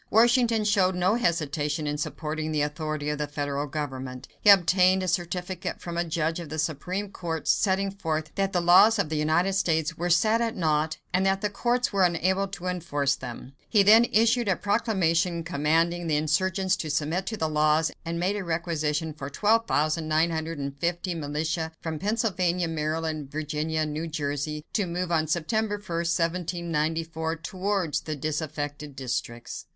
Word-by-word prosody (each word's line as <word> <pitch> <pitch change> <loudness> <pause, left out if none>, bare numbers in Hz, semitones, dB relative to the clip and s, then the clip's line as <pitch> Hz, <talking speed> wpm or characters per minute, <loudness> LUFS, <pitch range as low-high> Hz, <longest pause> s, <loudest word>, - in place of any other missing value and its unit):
Washington 235 0 +4
showed 195 -3 +2
no 180 +3 +2
hesitation 155 - 0
in 145 0 -1
supporting 155 +1 -3
the 150 -1 +1
authority 150 0 -3
of 150 0 -2
the 150 - -1
federal 145 0 -3
government. 130 -3 -5
He 210 - +5
obtained 185 -1 +5
a - - -2
certificate 180 +1 -2
from 170 -1 -6
a 170 - +1
judge 165 0 -1
of 170 -3 -7
the 155 - -5
Supreme 180 +6 -2
Court, 165 -4 -4
setting 195 -1 +2
forth 160 -5 -3
that 195 -1 0
the 180 -2 +1
laws 185 +6 +6
of 200 -7 0
the 155 - -2
United 160 +5 +2
States 165 -4 0
were 175 +1 -1
set 215 +6 +3
at 230 -1 -1
naught 155 -2 +1 0.2
and 185 +1 +2
that 195 0 +1
the 210 - -1
courts 245 +3 0
were 195 - +2
unable 185 +3 +1
to 190 -2 -8
enforce 145 -6 0
them. 125 +1 -8 0.2
He 210 -3 +5
then 220 +4 +7
issued 230 +1 +2
a 190 - +3
proclamation 180 -5 +1
commanding 165 +2 +1
the 155 - +1
insurgents 185 +5 +1
to 155 - -4
submit 155 +5 -1
to 220 - -3
the 160 - 0
laws, 155 +1 +2
and 170 0 -3
made 185 +4 0
a 200 - -3
requisition 160 -2 -1
for 140 -2 -7
12,950 160 -3 0
militia 160 +1 -2
from 160 -2 -4
Pennsylvania, 185 -4 0
Maryland, 155 -2 -2
Virginia, 155 +1 -2
and 155 -1 -2
New 160 +2 -3
Jersey, 150 0 -3
to 205 -4 0
move 175 +1 -3
on 160 -2 +2
September 205 +7 0
1, 205 - -10
1794, 165 -2 -1
towards 185 -1 -2
the 155 - -4
disaffected 145 -1 -4
districts. 120 -2 -5
165 Hz, 165 wpm, -26 LUFS, 155-185 Hz, 0.2 s, then